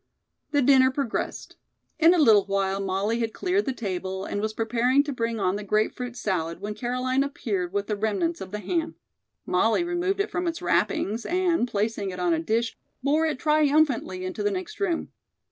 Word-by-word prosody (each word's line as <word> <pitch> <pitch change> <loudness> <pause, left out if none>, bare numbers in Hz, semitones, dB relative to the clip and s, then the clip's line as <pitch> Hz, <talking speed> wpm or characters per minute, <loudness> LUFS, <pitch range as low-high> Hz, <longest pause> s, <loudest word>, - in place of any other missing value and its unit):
The 290 -2 +2
dinner 260 0 +6
progressed. 265 -3 -3 0.4
In 335 +2 +6
a - - +1
little 220 - +6
while 195 -1 0
Molly 195 +4 -1
had 225 -1 -2
cleared 380 +2 0
the 270 - 0
table 190 -4 -4
and 205 - -3
was 215 0 -1
preparing 245 +5 +2
to 290 -1 -4
bring 230 -2 -2
on 190 0 +1
the 210 - -6
grape 215 +2 +1
fruit 245 -1 -6
salad 170 -6 -2
when 205 +2 -4
Caroline 255 +4 0
appeared 205 -10 -3
with 200 +1 -1
the 210 - -2
remnants 195 -5 -1
of 190 - -6
the 210 - -4
ham. 325 - -2 0.5
Molly 225 - +2
removed 350 +3 -1
it 405 +1 -1
from 360 0 -1
its 335 0 -2
wrappings 220 +4 0
and, 345 -7 +1
placing 210 -2 -1
it 180 -1 -6
on 175 -1 +2
a 160 - +1
dish, 225 +7 -1 0.3
bore 305 +4 +2
it 310 - -2
triumphantly 295 -10 +2
into 185 - -4
the 415 - +2
next 385 +2 -5
room. 360 -5 -1
230 Hz, 195 wpm, -26 LUFS, 200-300 Hz, 0.5 s, dinner